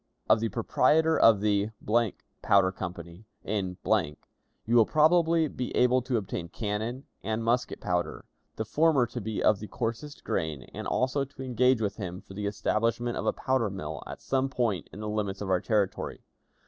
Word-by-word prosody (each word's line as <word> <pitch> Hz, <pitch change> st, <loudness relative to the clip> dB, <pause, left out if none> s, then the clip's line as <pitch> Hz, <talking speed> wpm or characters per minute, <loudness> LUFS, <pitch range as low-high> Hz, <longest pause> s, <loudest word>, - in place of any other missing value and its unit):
"Of 110 Hz, -, +5 dB
the 115 Hz, 0 st, -1 dB
proprietor 155 Hz, +8 st, +3 dB
of 110 Hz, -8 st, +5 dB
the 105 Hz, 0 st, +1 dB, 0.7 s
Powder 100 Hz, -2 st, +4 dB
Company, 85 Hz, +2 st, -8 dB, 0.2 s
in, 95 Hz, -3 st, -2 dB, 0.9 s
you 115 Hz, -, +1 dB
will 115 Hz, -2 st, +7 dB
probably 160 Hz, +1 st, +4 dB
be 125 Hz, -3 st, -4 dB
able 125 Hz, +1 st, +4 dB
to 125 Hz, -1 st, -1 dB
obtain 90 Hz, -5 st, -4 dB
cannon 110 Hz, +6 st, -3 dB, 0.2 s
and 110 Hz, +1 st, -2 dB
musket 120 Hz, +2 st, 0 dB
powder 90 Hz, -3 st, -2 dB, 0.3 s
the 110 Hz, -, -3 dB
former 145 Hz, +2 st, +3 dB
to 120 Hz, +1 st, -6 dB
be 110 Hz, +1 st, -3 dB
of 105 Hz, -2 st, +4 dB
the 105 Hz, -, -7 dB
coarsest 120 Hz, +7 st, -4 dB
grain; 80 Hz, -6 st, -2 dB
and -, -, -5 dB
also 130 Hz, +2 st, +1 dB
to 135 Hz, 0 st, -9 dB
engage 125 Hz, -1 st, +2 dB
with 105 Hz, -2 st, -2 dB
him 90 Hz, -3 st, -5 dB
for 95 Hz, -, -14 dB
the 100 Hz, +1 st, -3 dB
establishment 115 Hz, +4 st, 0 dB
of -, -, -3 dB
a -, -, +4 dB
powder 130 Hz, -5 st, 0 dB
mill 95 Hz, -1 st, -6 dB
at -, -, -8 dB
some 135 Hz, 0 st, 0 dB
point 115 Hz, -, -1 dB
in 105 Hz, -, -9 dB
the 105 Hz, -, -4 dB
limits 105 Hz, -2 st, -2 dB
of 100 Hz, -2 st, -3 dB
our 90 Hz, -1 st, +2 dB
territory. 105 Hz, -4 st, -1 dB
110 Hz, 175 wpm, -28 LUFS, 100-125 Hz, 0.9 s, will